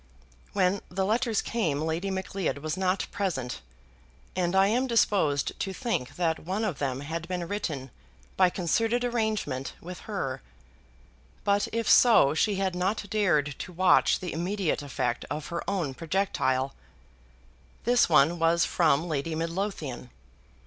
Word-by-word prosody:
When 195 0 +2
the 190 +1 -1
letters 225 +1 +1
came 165 -12 -1
Lady 160 +5 -1
Macleod 190 -3 -2
was 155 +2 -3
not 185 0 0
present, 160 - -3 0.7
and 180 0 0
I 190 0 +6
am 245 +6 +1
disposed 195 - +2
to 195 - -2
think 180 - -2
that 165 -1 0
one 195 +6 -2
of 180 -9 -3
them 135 -2 -2
had 165 +3 -5
been 180 -1 -3
written 155 - -4 0.4
by 185 -1 +5
concerted 225 +8 0
arrangement 220 - -1
with 180 +1 -8
her. 135 -11 -3 1.0
But 200 0 +2
if 230 -1 -2
so 220 - +6
she 205 +6 +1
had 190 -1 0
not 190 +3 -2
dared 165 -9 +2
to - - -6
watch 180 +1 +4
the 180 -3 -4
immediate 180 0 -1
effect 125 -4 -2
of 150 +2 -4
her 170 - -3
own 175 -9 -1
projectile. 140 -5 0 1.1
This 245 -3 +4
one 160 +2 +4
was 165 +1 +3
from 160 -1 +2
Lady 155 0 -2
Midlothian. 165 -6 -3
180 Hz, 140 wpm, -28 LUFS, 155-200 Hz, 1.1 s, I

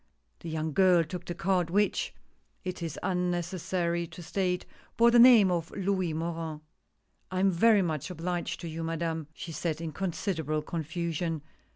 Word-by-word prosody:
The 170 - -7
young 160 -1 -2
girl 185 -2 +5
took 175 +2 -7
the 175 - -5
card, 180 -2 +1
which 205 +3 +1 0.5
it 185 -1 -5
is 165 -3 -4
unnecessary 175 -1 -1
to 175 - -10
state 180 +1 -1 0.3
bore 235 +1 +6
the 240 - +6
name 235 -6 +8
of 170 -1 -1
Louis 190 -3 0
Morin. 160 -1 -3 0.3
" - - -45
I 185 - -1
am 195 +1 +4
very 205 +3 +5
much 155 -2 -2
obliged 175 0 -3
to 170 - -5
you, 165 0 -4
Madame," 165 -1 -2
she 165 - -7
said 160 -1 -2
in 165 -1 -4
considerable 160 -3 -2
confusion. 165 0 -3
170 Hz, 165 wpm, -29 LUFS, 160-185 Hz, 0.5 s, name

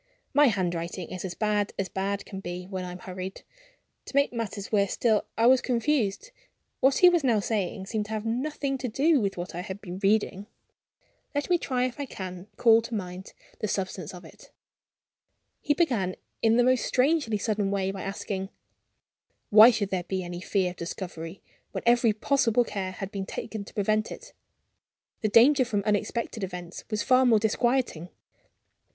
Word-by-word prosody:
My 290 +1 +6
handwriting 175 -4 -2
is 185 - -5
as 180 -2 -5
bad 210 -1 0
as 195 - -1
bad 195 +2 -3
can 195 - -7
be 180 -1 -6
when 190 -1 -5
I 180 - -6
am 180 - -7
hurried. 185 +1 -7 0.6
To - - -10
make 280 -2 +3
matters 210 -4 -4
worse 200 -3 +2
still, 220 -3 +2
I 225 - +3
was 255 +1 +6
confused. 250 - 0 0.5
What 265 +1 +4
he 360 - +8
was 345 -3 +2
now 235 -5 +3
saying 200 -2 -2
seemed 210 +1 -2
to 215 - -6
have 215 0 -3
nothing 270 +3 -2
to 250 - -2
do 280 +5 +3
with 195 -2 -1
what 175 +2 -5
I 175 - -4
had 190 +2 -6
been 185 -2 -7
reading. 205 -1 +1 0.9
Let 290 +5 -1
me 350 - +4
try 250 -4 0
if 255 +2 -5
I 285 - -3
can 185 -3 -7
call 230 -1 +6
to 230 0 -5
mind 185 -2 -6 0.3
the 215 - -1
substance 190 -4 -3
of 180 -2 -11
it. - - -15 1.1
He 290 - +1
began 230 - +1 0.3
in 225 0 +4
the 245 - +5
most 255 0 +3
strangely 265 -4 +2
sudden 205 -1 -1
way 195 -1 0
by 195 -1 -6
asking: 195 0 -4 1.0
"Why 215 +3 +10
should 210 -5 -1
there 185 -2 0
be 190 -1 -2
any 175 0 -6
fear 185 -1 0
of 180 - -14
discovery, 170 0 -6 0.3
when - - -4
every 235 -1 +4
possible 240 +1 +2
care 190 -4 -4
had 195 +1 -6
been 195 -1 -4
taken 220 -2 -5
to - - -13
prevent 215 +1 +1
it? - - -10 0.9
The 215 - +1
danger 255 +6 +6
from 210 -5 -1
unexpected 210 +1 -1
events 180 -2 -6
was 210 -1 -1
far 255 +2 +5
more 240 -3 +5
disquieting. 220 -5 0
210 Hz, 180 wpm, -27 LUFS, 190-240 Hz, 1.1 s, Why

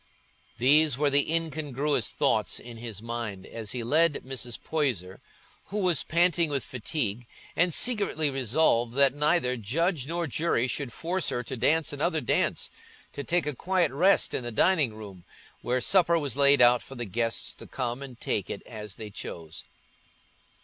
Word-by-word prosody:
These 145 +3 +4
were 145 0 +2
the 145 +2 +3
incongruous 150 -6 -1
thoughts - - +1
in 120 -1 -11
his 115 -3 -7
mind 115 -5 -5
as 110 -3 -6
he 125 -2 -3
led 155 +5 +2
Mrs. 125 -3 -4
Poyser, 120 - -2 0.5
who 205 - -5
was 180 -6 +2
panting 170 -1 +2
with 140 -4 -1
fatigue, 120 -1 -3 0.3
and 180 +1 +2
secretly 200 - +1
resolving 125 -2 +1
that 140 -1 +5
neither 150 -3 +1
judge 140 - -1
nor 170 +1 -2
jury 150 -4 0
should 135 -1 -3
force 175 +7 -2
her 120 - -2
to 130 - -6
dance 155 +5 +1
another 155 +3 0
dance, 125 - 0 0.4
to 140 - -5
take 175 -1 +1
a 150 - -2
quiet 180 +6 0
rest 180 +9 +3
in - - -2
the 120 - -5
dining 145 - +2
room, 100 -5 -11 0.4
where 125 +1 0
supper 170 +5 +4
was 145 -6 -2
laid 140 -1 +5
out 120 0 +5
for 135 - -11
the 120 -1 -4
guests 115 +2 -1
to - - -12
come 125 0 -4
and 130 -4 -10
take - - -2
it - - -6
as 105 -2 -8
they 110 -2 -8
chose. 80 -5 -8
135 Hz, 170 wpm, -27 LUFS, 120-160 Hz, 0.5 s, that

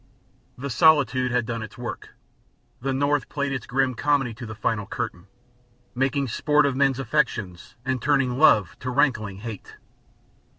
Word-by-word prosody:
The 140 +2 -5
solitude 135 -2 +4
had 120 -1 0
done 115 0 -4
its 110 -1 -9
work; 120 -1 -7 0.7
the 135 +2 -1
North 140 +2 +1
had - - -42
played 140 -1 -2
its 130 -4 -4
grim 130 0 +1
comedy 135 -2 +1
to 120 +1 -8
the 110 - -7
final 105 -1 -2
curtain, 105 -6 -5 0.7
making 135 +2 0
sport 150 +5 +2
of 140 -2 0
men's 135 -1 +2
affections 115 -9 -2
and 130 -2 -1
turning 135 -2 +1
love 105 - +5
to 130 - -4
rankling 110 -7 0
hate. 110 -4 -8
130 Hz, 160 wpm, -24 LUFS, 115-140 Hz, 0.7 s, love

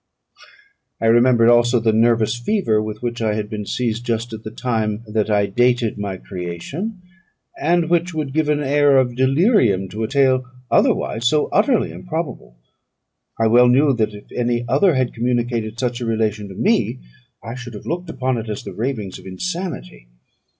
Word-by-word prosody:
I - - -2
remembered 120 0 +5
also 120 0 +4
the 110 -1 +1
nervous 115 0 +3
fever 120 - +1
with 110 +1 -6
which 120 -1 -3
I 110 -2 0
had 105 -1 -4
been 105 -2 -5
seized 120 -2 -2
just 115 0 -2
at 110 0 -7
the 110 - -5
time 110 -2 -2
that 110 0 -1
I 105 -1 +3
dated 120 +1 +1
my 100 -2 -4
creation, 100 - -6 0.6
and 170 +1 +2
which 175 +1 +1
would 155 -4 -4
give 155 0 +1
an 150 0 +1
air 145 0 +4
of 125 -2 +1
delirium 130 - +3
to 105 +3 -6
a - - -1
tale 130 -1 +2 0.3
otherwise 115 +2 +2
so 150 +3 +2
utterly 220 +3 +2
improbable. 155 - -6 0.8
I 115 - +3
well 120 +2 +6
knew 135 +3 +4
that 110 -3 -1
if 105 - -12
any 120 0 0
other 145 +7 +3
had 130 -2 0
communicated 120 -2 -2
such 125 -1 -2
a - - -2
relation 110 -2 -1
to 95 - -10
me, - - +1 0.5
I 115 - -6
should 125 -2 -8
have 105 - -10
looked 175 +1 -4
upon 130 -4 -1
it 110 0 -7
as 105 - -5
the - - -8
ravings 110 -5 -4
of - - -13
insanity. 95 - -5
120 Hz, 180 wpm, -20 LUFS, 110-135 Hz, 0.8 s, well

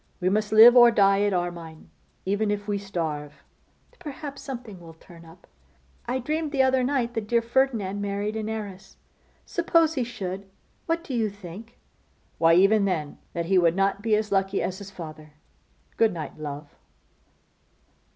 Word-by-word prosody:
We 185 0 +1
must 210 +2 0
live 225 +3 +9
or 240 -1 +9
die 200 -3 +3
at 205 0 +2
Armine, 175 -3 -5 0.3
even 205 +2 0
if 205 0 -3
we 205 -1 -1
starve.' 150 -7 -5 0.6
'Perhaps 290 -3 -8
something 245 -8 -8
will 165 -2 -13
turn 170 0 -16
up. 165 +2 -17 0.6
I 250 +2 0
dreamed 305 +4 -2
the 270 -3 +3
other 260 -1 +2
night 250 -3 0
that 225 -3 -4
dear 235 +1 +2
Ferdinand 230 -5 0
married 205 +1 -2
an 220 0 -3
heiress. 205 -4 -7 0.5
Suppose 335 -2 +2
he 260 -5 -1
should? 195 -4 -6 0.4
What 330 0 -1
do 275 - -7
you 225 -3 0
think?' 200 +3 -11 0.6
'Why, 165 0 +5
even 200 +3 +4
then, 160 -6 -3
that 170 0 -2
he 185 +2 +3
would 170 -1 +3
not 195 +1 +1
be 220 0 +2
as 210 0 -2
lucky 195 0 +1
as 190 +1 -3
his 200 -1 -9
father. 155 -5 -10 0.6
Good 225 -3 +3
night, 160 -2 -7
love! 145 -1 -7
205 Hz, 165 wpm, -25 LUFS, 180-235 Hz, 0.6 s, live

